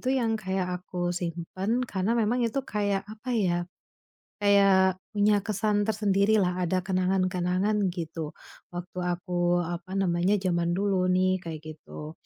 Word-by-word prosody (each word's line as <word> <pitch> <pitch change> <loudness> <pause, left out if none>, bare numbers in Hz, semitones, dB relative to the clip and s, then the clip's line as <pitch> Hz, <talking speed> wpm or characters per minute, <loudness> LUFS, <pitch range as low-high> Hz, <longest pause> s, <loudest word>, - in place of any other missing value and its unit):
itu 255 - -3
yang 230 -4 +1
kayak 190 -1 -1 0.2
aku 175 -1 -2
simpan 180 +6 -2
karena 195 0 -1
memang 235 +3 +2
itu 235 +4 0
kayak, 205 -2 -1
apa 220 +4 -7
ya, 180 -6 +2 0.8
kayak 195 -2 +5 0.2
punya 205 0 +4
kesan 210 0 +1
tersendirilah, 200 -3 +2
ada 185 +1 0
kenangan-kenangan, 185 +2 +1
gitu. 165 -3 -5 0.4
Waktu 180 +1 -6
aku, 175 0 0
apa 175 +2 -5
namanya, 185 +1 +2
zaman 170 -2 0
dulu 195 -2 +1
nih, 185 +1 +3
kayak 160 -3 -6
gitu. 150 0 -9
185 Hz, 130 wpm, -27 LUFS, 175-205 Hz, 0.8 s, kayak